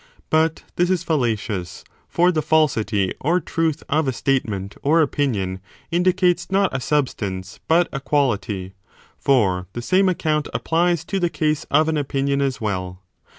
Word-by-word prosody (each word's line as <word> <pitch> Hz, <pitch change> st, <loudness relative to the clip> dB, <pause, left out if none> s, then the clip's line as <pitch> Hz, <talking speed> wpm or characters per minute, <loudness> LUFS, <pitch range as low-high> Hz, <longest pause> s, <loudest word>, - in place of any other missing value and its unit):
But 160 Hz, 0 st, +2 dB
this 175 Hz, 0 st, +2 dB
is 185 Hz, -2 st, +1 dB
fallacious, 115 Hz, -, -2 dB, 0.3 s
for 175 Hz, +1 st, +3 dB
the 155 Hz, -3 st, 0 dB
falsity 110 Hz, -12 st, +1 dB
or 170 Hz, +6 st, +2 dB
truth 160 Hz, -2 st, -1 dB
of 155 Hz, 0 st, +1 dB
a -, -, +2 dB
statement 110 Hz, -7 st, -1 dB
or 155 Hz, +4 st, +3 dB
opinion 115 Hz, -, 0 dB, 0.3 s
indicates 180 Hz, 0 st, +2 dB
not 195 Hz, -6 st, +1 dB
a -, -, 0 dB
substance 110 Hz, -8 st, -2 dB
but 170 Hz, +2 st, +4 dB
a 135 Hz, -, -3 dB
quality: 105 Hz, -10 st, -1 dB, 0.5 s
for 95 Hz, -9 st, +2 dB
the 120 Hz, -, -4 dB
same 185 Hz, +8 st, +3 dB
account 155 Hz, -4 st, 0 dB
applies 170 Hz, 0 st, +1 dB
to 195 Hz, +2 st, -2 dB
the 175 Hz, -2 st, +1 dB
case 155 Hz, -2 st, -1 dB
of 155 Hz, +2 st, +3 dB
an 160 Hz, -1 st, 0 dB
opinion 140 Hz, -1 st, 0 dB
as 135 Hz, -2 st, -1 dB
well. 95 Hz, -3 st, -4 dB
145 Hz, 150 wpm, -21 LUFS, 110-165 Hz, 0.5 s, but